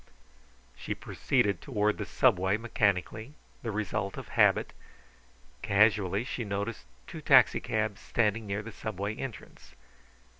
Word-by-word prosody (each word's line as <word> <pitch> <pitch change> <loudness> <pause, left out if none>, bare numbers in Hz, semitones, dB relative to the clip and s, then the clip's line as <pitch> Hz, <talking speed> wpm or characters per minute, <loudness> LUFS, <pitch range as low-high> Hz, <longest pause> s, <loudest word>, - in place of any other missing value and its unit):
She - - -5
proceeded 100 -1 0
toward 105 -5 0
the 100 - -4
Subway 95 -5 +2
mechanically, 110 +3 -1 0.3
the 115 - -4
result 105 -1 -3
of - - -8
habit. - - +3 0.9
Casually 105 0 +3
she 125 -1 -4
noted 100 +2 -3 0.3
two - - -9
taxicabs 110 -2 +3
standing 110 -1 0
near 100 +1 -3
the 115 - -8
Subway 100 -1 -4
entrance. 130 -4 -9
105 Hz, 115 wpm, -29 LUFS, 100-110 Hz, 0.9 s, habit